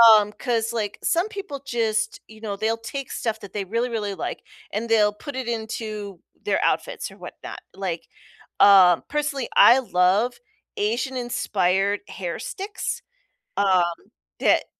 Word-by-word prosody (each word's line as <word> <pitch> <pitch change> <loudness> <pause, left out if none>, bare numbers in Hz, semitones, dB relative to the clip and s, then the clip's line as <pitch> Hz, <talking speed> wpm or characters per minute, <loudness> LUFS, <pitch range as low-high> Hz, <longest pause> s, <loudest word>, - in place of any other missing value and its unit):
Um, 210 0 +3
'cause, 230 -1 -1
like, 210 -3 -3
some 345 +5 +2
people 395 -10 -6
just, 220 -2 0
you 220 0 -15
know, 205 -2 -3
they'll 220 +3 0
take 265 +3 -6
stuff 225 -2 -2
that 200 - -10
they 205 -2 -2
really, 230 +5 -1
really 210 -4 -2
like, - - -5 0.3
and 225 +3 -3
they'll 210 -2 +4
put 280 +6 -8
it 260 -2 -3
into 215 -4 -4 0.2
their - - +1
outfits - - -1
or - - -15
whatnot. - - -9
Like, 180 -4 -4 0.5
um, 185 -4 +7
personally, 295 -3 -1
I 245 - +8
love 205 +1 +2 0.4
Asian-inspired 210 -4 0
hair 175 -3 -5
sticks, 400 +2 -4 0.6
um, 190 -3 +4 0.6
that - - +3
220 Hz, 140 wpm, -24 LUFS, 200-245 Hz, 0.6 s, I